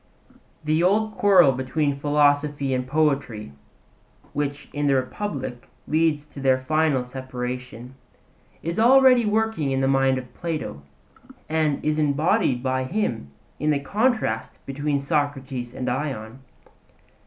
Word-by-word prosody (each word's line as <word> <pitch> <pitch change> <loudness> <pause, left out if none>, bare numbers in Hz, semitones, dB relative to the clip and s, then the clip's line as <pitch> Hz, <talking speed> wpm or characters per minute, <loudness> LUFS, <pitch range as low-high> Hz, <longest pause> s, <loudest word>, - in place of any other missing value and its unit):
The 155 +1 +1
old 215 +5 +2
quarrel 190 -8 +6
between 140 +2 -1
philosophy 145 -1 +2
and 125 0 -2
poetry, 140 - 0 0.8
which 145 0 -3
in 145 0 -1
the 140 - +3
Republic 130 -2 -4 0.2
leads 155 -2 +1
to 150 -1 -12
their 130 -1 +3
final 150 0 +1
separation, 125 -1 -6 0.7
is 170 +5 -2
already 250 -1 +6
working 220 -8 0
in 135 0 0
the 135 - +1
mind 135 -1 +3
of 125 -1 -8
Plato, 160 - -4 0.7
and 155 -2 0
is 155 0 +1
embodied 145 -4 +1
by 130 0 0
him 130 - -2 0.3
in 150 - 0
the 145 -2 +2
contrast 205 - -1
between 145 +1 -1
Socrates 140 -4 -2
and 130 - -5
Ion. 125 -3 -3
145 Hz, 125 wpm, -24 LUFS, 130-155 Hz, 0.8 s, quarrel